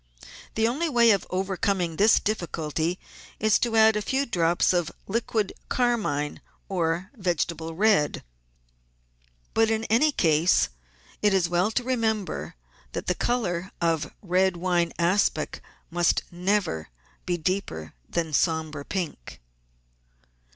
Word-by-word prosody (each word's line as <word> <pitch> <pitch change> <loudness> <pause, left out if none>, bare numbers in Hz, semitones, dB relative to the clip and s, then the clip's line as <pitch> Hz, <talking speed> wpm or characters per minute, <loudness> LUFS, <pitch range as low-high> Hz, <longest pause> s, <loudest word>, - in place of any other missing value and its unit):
The 220 0 +3
only 300 +8 0
way 235 -4 +5
of 200 - +1
overcoming 190 -2 -1
this 215 +3 +5
difficulty 170 -4 -2 0.4
is 215 0 +3
to 235 -2 0
add 220 0 +6
a 210 - 0
few 270 +6 0
drops 175 -6 +2
of 175 -3 0
liquid 220 -1 -1 0.2
carmine 215 - 0 0.3
or 175 0 -1
vegetable 170 -4 -2
red; 200 -6 +2 1.3
but, 225 0 +3
in 220 0 0
any 290 +7 +4
case, 165 - +3 0.5
it 210 -2 +3
is 180 -3 +2
well 175 +4 +1
to 245 +3 -1
remember 225 -5 -1 0.4
that - - -4
the 180 - +1
colour 185 -5 -1
of 165 -3 0
red 185 0 +2
wine 175 -1 +1
aspic 180 +4 +1 0.3
must 175 0 +2
never 180 - -1 0.4
be 175 -1 0
deeper 160 - -3 0.2
than 165 -1 -1
a - - -11
sombre 160 -1 0
pink. 165 - -5
185 Hz, 125 wpm, -26 LUFS, 170-220 Hz, 1.3 s, add